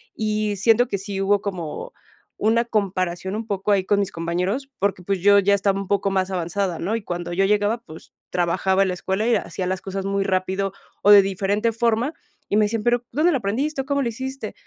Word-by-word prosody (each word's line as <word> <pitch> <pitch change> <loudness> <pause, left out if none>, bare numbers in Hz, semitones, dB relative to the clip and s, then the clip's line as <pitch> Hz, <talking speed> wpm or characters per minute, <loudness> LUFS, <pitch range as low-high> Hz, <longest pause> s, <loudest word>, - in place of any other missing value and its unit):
y 215 -1 -1
siento 230 +4 +4
que 200 - -2
sí 195 -1 -4
hubo 200 +1 +2
como 190 - -5 0.4
una 230 +2 +2
comparación 190 -3 -1
un 225 +1 -4
poco 200 0 -1
ahí 195 -2 +2
con 200 +1 +2
mis 200 - -2
compañeros, 180 +11 -2
porque, 200 -2 0
pues, 195 +1 -1
yo 200 +1 +6
ya 200 +1 +3
estaba 195 0 +1
un 195 - -7
poco 200 -1 +1
más 190 -1 0
avanzada, 180 0 -2
¿no?, 200 +6 -1
y 225 - -8
cuando 175 -1 -4
yo 195 +2 +2
llegaba, 210 +3 +2
pues, 160 -9 -13 0.2
trabajaba 185 +2 +1
en 190 - 0
la - - -1
escuela 190 +3 -2
y 240 - +4
hacía 185 -2 -3
las 185 0 -2
cosas 195 0 -4
muy 195 0 0
rápido 190 +1 -1 0.3
o 205 - +7
de 200 -1 +10
diferente 200 +4 0
forma, 235 +5 0 0.4
y 205 - +2
me 215 - +5
decían: 215 0 -2
"Pero, 240 0 +1
¿dónde 325 +4 +3
lo 275 - +2
aprendiste?", 270 +8 -1
o - - -9
"¿cómo 280 0 0
lo 235 - 0
hiciste?", 265 +4 -6
200 Hz, 220 wpm, -22 LUFS, 190-220 Hz, 0.4 s, de